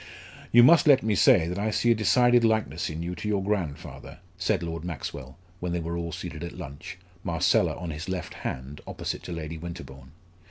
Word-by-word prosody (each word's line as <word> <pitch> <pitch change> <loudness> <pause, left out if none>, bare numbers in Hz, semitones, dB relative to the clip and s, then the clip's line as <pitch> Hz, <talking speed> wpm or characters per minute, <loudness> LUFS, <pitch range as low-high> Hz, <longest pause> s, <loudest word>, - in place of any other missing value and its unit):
"You 120 +1 +8
must 170 +5 +6
let 135 -3 +6
me 110 -1 +1
say 80 -2 +5
that 90 +3 -3
I 105 +2 0
see 120 +2 +2
a - - +7
decided 120 +3 +4
likeness 110 -7 +1
in 80 +1 -5
you 90 +1 -3
to 90 +4 -6
your 100 -2 0
grandfather," 95 -8 -4 0.2
said - - 0
Lord 85 -1 -4
Maxwell, 70 -5 -6 0.2
when 90 -1 -3
they 85 - 0
were 85 +1 -4
all 85 -1 -3
seated 80 0 -6
at 85 - -7
lunch, 80 +8 -8 0.3
Marcella 85 +1 +2
on 85 -2 -5
his 75 +5 -6
left 90 -3 -4
hand, 65 +3 -6
opposite - - -4
to - - -8
Lady 80 -1 -5
Winterbourne. 70 -5 -9
85 Hz, 200 wpm, -27 LUFS, 80-105 Hz, 0.3 s, You